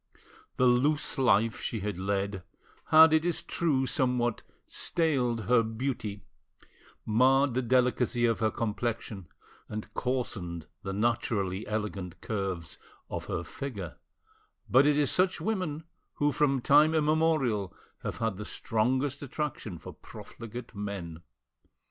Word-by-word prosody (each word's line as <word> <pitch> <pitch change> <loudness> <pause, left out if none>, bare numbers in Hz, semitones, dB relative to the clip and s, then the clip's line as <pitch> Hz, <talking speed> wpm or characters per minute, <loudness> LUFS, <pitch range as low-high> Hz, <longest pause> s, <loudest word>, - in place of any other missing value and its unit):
The 130 - +4
loose 140 +4 +2
life 115 -3 +3
she 110 - -3
had 100 -2 -3
led 100 0 -1 0.4
had, 160 0 +8
it 160 0 +4
is 175 -1 -1
true, 145 -6 0
somewhat 125 -2 0 0.2
staled 130 -9 0
her 120 +2 +4
beauty, 110 -3 -3 0.8
marred 130 +4 +4
the 130 - +1
delicacy 125 -1 +2
of 115 -1 +1
her 110 -1 +2
complexion, 110 -4 -3 0.4
and 105 0 -6
coarsened 95 -10 -3 0.2
the 95 - -4
naturally 105 -2 -1
elegant 105 -4 -4
curves 95 -6 -4 0.3
of - - -4
her - - -3
figure; 105 - -6 0.7
but 135 +3 +5
it 150 -1 +3
is 145 -2 +3
such 185 0 +2
women 180 -8 -2 0.3
who 145 0 +2
from 140 -2 +2
time 150 +5 +5
immemorial 150 - +2 0.3
have - - -4
had 115 -4 -1
the 105 - -5
strongest 130 +8 0
attraction 140 - -4
for - - -10
profligate 115 +1 -10
men. 100 -6 -5
120 Hz, 125 wpm, -29 LUFS, 105-140 Hz, 0.8 s, had